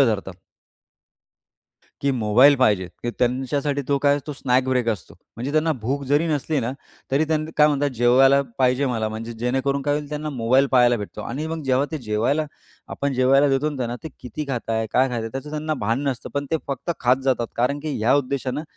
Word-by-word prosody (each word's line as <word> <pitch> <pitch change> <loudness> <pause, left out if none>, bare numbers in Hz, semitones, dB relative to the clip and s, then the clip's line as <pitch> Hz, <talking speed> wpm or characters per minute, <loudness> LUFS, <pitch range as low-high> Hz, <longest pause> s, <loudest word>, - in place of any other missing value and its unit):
धरतात 105 -7 +1 1.7
की 140 - +1
मोबाईल 125 +5 +5
पाहिजे, 105 -8 +2 0.2
की 120 - -1
त्यांच्यासाठी 135 +3 0
तो 140 - +3
काय, 145 +1 +3
तो 150 - -4
स्नॅक 130 -2 +1
ब्रेक 125 -2 +1
असतो. 105 -9 -3 0.2
म्हणजे 130 +5 -4
त्यांना 155 +1 +2
भूक 135 +5 -1
जरी 145 +5 +2
नसली 155 -1 -1
ना, 120 +2 -2 0.4
तरी 140 +4 +2
त्यांनी 155 0 -1
काय 150 - +6
म्हणतात 145 -1 +1
जेवायला 130 +3 +5 0.2
पाहिजे 130 +1 +2
मला 115 -3 -1
म्हणजे 110 +2 -6
जेणेकरून 130 +4 -1
काय 145 +1 +1
होईल, 150 -1 -4
त्यांना 150 +1 -4
मोबाईल 130 +1 +2
पाहायला 120 -1 +5
भेटतो 105 -3 -7
आणि 145 +6 -4
मग 160 -1 -4
जेव्हा 135 +2 +2
ते 155 - -2
जेवायला 120 +7 0 0.4
आपण 140 0 -2
जेवायला 135 +3 +4
देतो 135 +3 +1
ना, 145 - -6
त्यांना 120 -2 -3
ते 160 - -5
किती 125 +4 -6
खाताय? 115 -3 -2
काय 130 - +4
खाताय 120 -2 -3
आहे? 115 - -4
त्याचं 135 +5 -7
त्यांना 155 0 -2
भान 115 +6 0
नसतं. 130 -2 -4
पण 140 0 -2
ते 160 - +2
फक्त 140 +5 -3
खात 125 +1 +4
जातात 125 -3 +1
कारण, 125 +4 +1
की 150 -1 -3
ह्या 115 +5 +3
उद्देशानं 140 0 -1
135 Hz, 200 wpm, -22 LUFS, 120-145 Hz, 1.7 s, काय